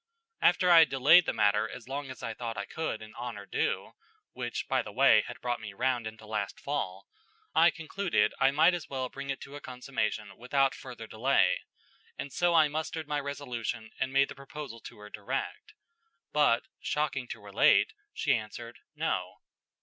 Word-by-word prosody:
After 180 Hz, -2 st, +4 dB
I 170 Hz, -, +10 dB
had 160 Hz, -4 st, +6 dB
delayed 140 Hz, +6 st, +6 dB
the -, -, +2 dB
matter 105 Hz, 0 st, +2 dB
as 120 Hz, -1 st, -10 dB
long 140 Hz, +1 st, -4 dB
as 130 Hz, -4 st, -9 dB
I 115 Hz, -, -3 dB
thought 115 Hz, -1 st, -5 dB
I 100 Hz, -, -3 dB
could 160 Hz, -9 st, -4 dB
in 110 Hz, -, -12 dB
honor 120 Hz, -4 st, -6 dB
do -, -, -1 dB, 0.4 s
(which, -, -, -4 dB
by -, -, +2 dB
the -, -, -8 dB
way, -, -, +6 dB
had -, -, -8 dB
brought 120 Hz, -1 st, -2 dB
me 105 Hz, -2 st, -7 dB
round 125 Hz, +1 st, 0 dB
into 110 Hz, 0 st, -10 dB
last 105 Hz, -2 st, -3 dB
fall), 95 Hz, -9 st, -3 dB, 0.5 s
I -, -, +6 dB
concluded 165 Hz, -, 0 dB
I 135 Hz, -, +5 dB
might 155 Hz, +6 st, +5 dB
as 175 Hz, -3 st, -4 dB
well 130 Hz, -2 st, -3 dB
bring 140 Hz, +1 st, -7 dB
it 135 Hz, -, -2 dB
to 140 Hz, -, -9 dB
a 145 Hz, -, -8 dB
consummation 110 Hz, -6 st, -3 dB
without 135 Hz, +3 st, +2 dB
further 125 Hz, -3 st, -9 dB
delay, 120 Hz, +6 st, +2 dB, 0.6 s
and 140 Hz, -, -6 dB
so 175 Hz, -1 st, +2 dB
I 155 Hz, -2 st, +6 dB
mustered 155 Hz, +1 st, -4 dB
my 150 Hz, -1 st, 0 dB
resolution 120 Hz, -6 st, -4 dB
and 130 Hz, -, -1 dB
made 140 Hz, +1 st, +3 dB
the -, -, -6 dB
proposal 135 Hz, -3 st, -8 dB
to -, -, -11 dB
her 105 Hz, 0 st, -12 dB
direct; 110 Hz, -, -5 dB, 0.6 s
but, 145 Hz, -6 st, +4 dB, 0.2 s
shocking 150 Hz, -4 st, -1 dB
to -, -, -7 dB
relate, 105 Hz, -, +3 dB, 0.2 s
she -, -, +1 dB
answered, -, -, -7 dB, 0.2 s
No. -, -, -2 dB
130 Hz, 185 wpm, -30 LUFS, 110-145 Hz, 0.6 s, I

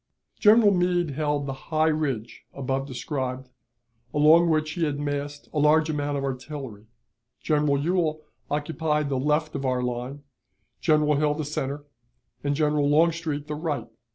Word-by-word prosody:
General 215 Hz, -1 st, +6 dB
Meade 175 Hz, -3 st, +1 dB
held 145 Hz, 0 st, -1 dB
the 135 Hz, -, -3 dB, 0.2 s
high 155 Hz, -1 st, +2 dB
ridge 135 Hz, -8 st, -2 dB
above 135 Hz, 0 st, -2 dB
described, 130 Hz, -1 st, -4 dB, 0.7 s
along 160 Hz, +3 st, +6 dB
which 155 Hz, -1 st, +1 dB
he 170 Hz, +2 st, -2 dB
had 145 Hz, -2 st, -1 dB
massed 145 Hz, 0 st, -4 dB
a 150 Hz, -, 0 dB
large 155 Hz, +2 st, +4 dB
amount 145 Hz, -1 st, -2 dB
of 135 Hz, -, -3 dB
artillery. 130 Hz, -5 st, -6 dB, 0.5 s
General 150 Hz, -2 st, +1 dB
Ewell 155 Hz, 0 st, 0 dB, 0.3 s
occupied 150 Hz, 0 st, -1 dB
the 135 Hz, -2 st, 0 dB
left 150 Hz, +3 st, 0 dB
of 140 Hz, -, -4 dB
our 130 Hz, -1 st, 0 dB
line, 125 Hz, +3 st, -4 dB, 0.6 s
General 150 Hz, -1 st, +3 dB
Hill 150 Hz, 0 st, +1 dB
the 155 Hz, -1 st, -3 dB
center, 145 Hz, 0 st, -4 dB, 0.6 s
and 145 Hz, 0 st, 0 dB
General 150 Hz, -1 st, +2 dB
Longstreet 160 Hz, -1 st, +1 dB
the 150 Hz, -, -5 dB
right. 150 Hz, -5 st, -3 dB
150 Hz, 150 wpm, -25 LUFS, 140-155 Hz, 0.7 s, General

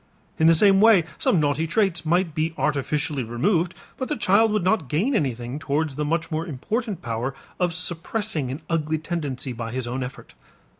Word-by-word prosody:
In 160 Hz, -, +5 dB
the 165 Hz, -, +7 dB
same 195 Hz, +2 st, +5 dB
way 220 Hz, -5 st, +7 dB, 0.2 s
some 175 Hz, -, +3 dB
naughty 150 Hz, +2 st, +1 dB
traits 170 Hz, -3 st, 0 dB
might 175 Hz, 0 st, +2 dB
be 160 Hz, +1 st, -1 dB
artificially 150 Hz, 0 st, 0 dB
removed 165 Hz, -, 0 dB, 0.2 s
but 260 Hz, -, -3 dB
the 300 Hz, -, -1 dB
child 215 Hz, +4 st, +4 dB
would 210 Hz, -3 st, +1 dB
not 185 Hz, -, +1 dB
gain 200 Hz, -, +1 dB
anything 130 Hz, -, -1 dB
towards 150 Hz, 0 st, -1 dB
the 150 Hz, -, -1 dB
much 165 Hz, +3 st, -1 dB
more 160 Hz, +2 st, -2 dB
important 200 Hz, -, -3 dB
power 120 Hz, +3 st, -3 dB, 0.2 s
of 180 Hz, -1 st, +2 dB
suppressing 180 Hz, -, -2 dB
an 140 Hz, +5 st, -6 dB
ugly 160 Hz, -1 st, 0 dB
tendency 145 Hz, -6 st, -3 dB
by 115 Hz, -1 st, -5 dB
his 130 Hz, 0 st, -3 dB
own 125 Hz, +2 st, -3 dB
effort. 125 Hz, +2 st, -8 dB
160 Hz, 185 wpm, -24 LUFS, 140-185 Hz, 0.2 s, the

